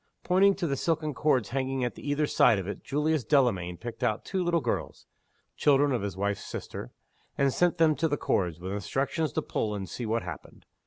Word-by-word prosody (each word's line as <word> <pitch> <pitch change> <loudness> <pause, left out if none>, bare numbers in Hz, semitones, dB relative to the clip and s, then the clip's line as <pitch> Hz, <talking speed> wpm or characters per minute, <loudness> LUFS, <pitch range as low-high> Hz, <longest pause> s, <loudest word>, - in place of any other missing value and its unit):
Pointing 195 +2 +4
to 185 - -2
the 140 -4 0
silken 155 0 -1
cords 130 -6 +1
hanging 130 0 -1
at 120 - -2
either 145 +1 0
side 115 - +4
of 95 -1 -4
it, 100 - -6
Julius 150 0 0
Delamayn 105 - +2
picked 120 +2 -7
out 110 -1 0
two 190 -2 -1
little 170 -1 +2
girls - - -3 0.5
(children 145 0 +3
of 125 - 0
his 100 -2 -4
wife's 100 +1 -1
sister), - - -6 0.5
and 140 -1 +2
sent 175 0 +2
them 160 -2 +5
to 160 - +2
the 145 -1 -1
cords, 85 -9 0
with 95 +2 -5
instructions 135 +9 -1
to - - -1
pull, 105 -1 -2
and 95 -2 -5
see 115 +7 -5
what 115 +1 0
happened. - - -9
135 Hz, 205 wpm, -28 LUFS, 105-155 Hz, 0.5 s, them